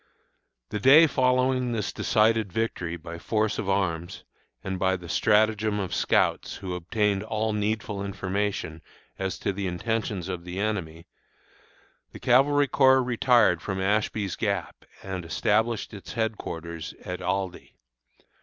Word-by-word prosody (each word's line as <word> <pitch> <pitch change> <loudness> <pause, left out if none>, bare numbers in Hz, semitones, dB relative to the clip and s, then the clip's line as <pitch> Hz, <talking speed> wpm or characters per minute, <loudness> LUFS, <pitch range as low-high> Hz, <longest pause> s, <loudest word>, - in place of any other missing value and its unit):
The 105 - -3
day 140 +9 +8
following 130 -3 +1
this 110 -3 -2
decided 110 -2 +2
victory 90 -5 -2
by 85 0 -9
force 110 +4 0
of 100 - -3
arms, 85 -3 -1 0.4
and 95 -1 -3
by 95 0 +2
the 90 -2 -9
stratagem 110 +1 +2
of 95 -3 -3
scouts, - - +1
who 95 -2 -5
obtained 100 +3 0
all 110 0 -2
needful 105 -1 -2
information 100 -4 -3 0.4
as 95 -2 -2
to 100 - -2
the 100 0 -3
intentions 100 0 -2
of 90 -2 -5
the 90 +1 -7
enemy, 90 -6 -3 1.1
the - - -9
Cavalry 140 +3 +4
Corps 130 -1 +5
retired 120 -7 +3
from 95 -2 -3
Ashby's 100 0 0
Gap 100 -5 -3 0.2
and 95 -2 -5
established 110 +7 0
its 100 - -9
headquarters 85 -8 -4
at 90 0 -5
Aldie. 95 -2 -3
100 Hz, 135 wpm, -26 LUFS, 90-110 Hz, 1.1 s, day